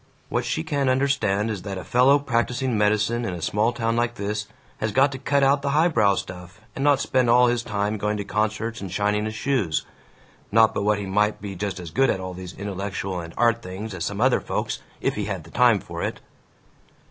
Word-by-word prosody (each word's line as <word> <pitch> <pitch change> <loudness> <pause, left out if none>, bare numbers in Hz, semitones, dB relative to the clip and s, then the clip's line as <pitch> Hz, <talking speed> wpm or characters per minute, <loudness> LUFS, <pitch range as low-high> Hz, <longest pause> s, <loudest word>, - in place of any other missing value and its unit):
What 120 0 -1
she 155 +6 -1
can't 145 -4 0
understand 120 -6 +1
is 100 -4 -4
that 100 -1 -5
a 90 - -6
fellow 130 +4 +4
practising 125 -2 -1
medicine 105 +3 +1
in 95 -6 -3
a - - -6
small 105 +6 +1
town 115 -1 -1
like 120 0 0
this 105 0 -3 0.3
has 110 - -1
got 135 +5 +4
to 135 - -6
cut 140 +1 +1
out 140 +1 +4
the 140 - -1
highbrow 115 - +4
stuff, 90 +1 -7 0.2
and 135 - -3
not 145 -2 +4
spend 130 -3 +1
all 125 +1 +6
his 120 -1 +1
time 105 -1 -2
going 105 +1 -1
to 100 - -3
concerts 110 +2 -2
and 95 -3 -6
shining 105 +2 0
his 110 0 -4
shoes. 110 - 0 0.7
(Not 110 +1 +5
but - - -1
what 105 0 +3
he 100 - -4
might 105 +2 +1
be 100 -1 -6
just 95 0 -4
as 85 -3 -8
good 135 +11 +3
at - - 0
all 95 0 -5
these 90 0 -8
intellectual 100 -1 -4
and 85 -1 -7
art 115 0 +3
things 100 +2 -6
as 90 -3 -4
some 100 +2 -3
other 130 +2 +3
folks, - - -3 0.2
if - - +1
he - - -3
had - - -4
the - - -15
time - - +4
for - - -7
it!)" - - -3
110 Hz, 225 wpm, -24 LUFS, 100-125 Hz, 0.7 s, all